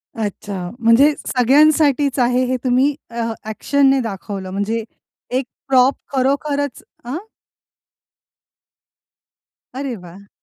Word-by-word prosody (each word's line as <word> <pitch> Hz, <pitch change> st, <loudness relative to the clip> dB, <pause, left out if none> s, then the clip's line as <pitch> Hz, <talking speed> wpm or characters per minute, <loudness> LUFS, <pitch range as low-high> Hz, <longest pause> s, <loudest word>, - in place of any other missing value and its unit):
अच्छा. 200 Hz, -4 st, -4 dB
म्हणजे 240 Hz, +6 st, +5 dB
सगळ्यांसाठीच 280 Hz, +1 st, +3 dB
आहे 250 Hz, +1 st, +3 dB
हे 255 Hz, -, 0 dB
तुम्ही 260 Hz, +3 st, +2 dB
अ, 235 Hz, 0 st, -3 dB, 0.2 s
ॲक्शनने 270 Hz, +5 st, +2 dB
दाखवलं 195 Hz, -3 st, -5 dB
म्हणजे, 210 Hz, +4 st, -2 dB, 0.5 s
एक 255 Hz, 0 st, 0 dB, 0.2 s
प्रॉप 260 Hz, 0 st, +4 dB, 0.2 s
खरोखरच 280 Hz, +1 st, 0 dB, 0.2 s
अ 250 Hz, +4 st, -4 dB, 2.6 s
अरे 265 Hz, -2 st, -3 dB
वाह! 195 Hz, +4 st, -13 dB
250 Hz, 90 wpm, -19 LUFS, 225-275 Hz, 2.6 s, म्हणजे